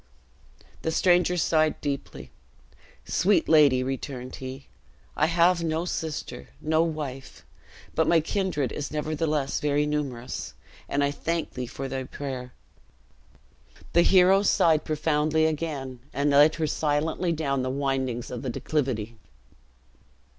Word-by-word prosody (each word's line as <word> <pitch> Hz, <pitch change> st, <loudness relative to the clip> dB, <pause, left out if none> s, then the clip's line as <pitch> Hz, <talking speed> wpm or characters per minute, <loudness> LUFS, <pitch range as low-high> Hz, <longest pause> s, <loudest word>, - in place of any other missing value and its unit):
The -, -, -1 dB
stranger 180 Hz, +1 st, +3 dB
sighed 155 Hz, -1 st, +2 dB
deeply: 140 Hz, -2 st, -5 dB, 0.7 s
"Sweet 200 Hz, +2 st, +2 dB
lady," 145 Hz, -5 st, +5 dB
returned 130 Hz, -1 st, -5 dB
he, 130 Hz, +1 st, -8 dB, 0.5 s
"I 155 Hz, -, +2 dB
have 170 Hz, +1 st, +3 dB
no 160 Hz, +1 st, -1 dB
sister, 160 Hz, -4 st, -5 dB
no 155 Hz, +1 st, +2 dB
wife. 150 Hz, -5 st, -5 dB, 0.5 s
But -, -, +1 dB
my 170 Hz, -, +5 dB
kindred 160 Hz, -, -1 dB
is 145 Hz, -, -4 dB
nevertheless 150 Hz, -2 st, -1 dB
very 145 Hz, 0 st, +1 dB
numerous, 135 Hz, -5 st, -4 dB, 0.3 s
and 140 Hz, 0 st, +1 dB
I 140 Hz, -, +1 dB
thank 165 Hz, +3 st, -2 dB
thee 125 Hz, -1 st, -4 dB
for 135 Hz, +3 st, -6 dB
thy 130 Hz, 0 st, -4 dB
prayer." 130 Hz, -2 st, -6 dB, 1.4 s
The 170 Hz, -, +6 dB
hero 190 Hz, +2 st, +5 dB
sighed 160 Hz, -6 st, +3 dB
profoundly 155 Hz, 0 st, +1 dB
again, 145 Hz, -5 st, -3 dB
and 140 Hz, +2 st, +1 dB
led 145 Hz, +2 st, +6 dB
her 160 Hz, -, -1 dB
silently 155 Hz, +4 st, 0 dB
down 140 Hz, -4 st, -1 dB
the 130 Hz, -, -2 dB
windings 130 Hz, -3 st, -2 dB
of 125 Hz, -, -5 dB
the 130 Hz, -, -3 dB
declivity. 120 Hz, -5 st, -2 dB
150 Hz, 125 wpm, -26 LUFS, 135-160 Hz, 1.4 s, The